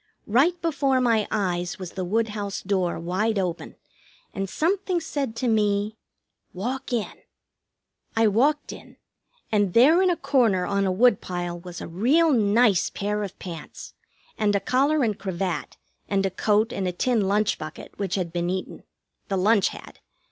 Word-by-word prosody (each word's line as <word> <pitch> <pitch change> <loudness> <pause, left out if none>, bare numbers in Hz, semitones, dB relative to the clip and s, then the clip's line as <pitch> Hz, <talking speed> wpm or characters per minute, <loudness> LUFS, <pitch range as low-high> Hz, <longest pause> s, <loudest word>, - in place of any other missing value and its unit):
Right 290 +11 +3
before 280 -5 +1
my 230 -4 +2
eyes 180 -4 -1
was 185 -2 -7
the 185 - -4
woodhouse 205 0 -2
door 185 -3 0
wide 190 +6 -1
open, 180 -3 -3 0.6
and 195 -1 -3
something 365 - 0
said 285 -7 -3
to 250 - -2
me: 210 -1 +1 0.6
"Walk 245 +10 -4
in." 235 -4 -2 1.0
I 225 0 +4
walked 270 +8 +2
in; - - -14 0.5
and 205 -4 +1
there 300 +10 +6
in 375 - +3
a 350 - +1
corner 225 -13 +2
on 200 -1 0
a - - +1
woodpile 180 -5 +1
was 175 -1 -9
a - - -6
real 270 - +3
nice 215 -3 +3
pair 210 +1 -2
of 200 -2 -6
pants, 170 -4 -9 0.5
and 205 -1 +2
a - - +3
collar 275 +8 +2
and 215 -3 -1
cravat, 190 -2 -3 0.3
and 195 -1 +1
a 190 - 0
coat 215 +4 +1
and 190 -1 -2
a - - 0
tin 225 0 +1
lunch 210 +1 +1
bucket, 155 0 -8
which 195 -3 -1
had 175 -4 -3
been 175 0 -1
eaten 185 0 -4 0.5
the 195 - -1
lunch 205 +2 +3
had. - - -10
205 Hz, 160 wpm, -25 LUFS, 185-245 Hz, 1.0 s, there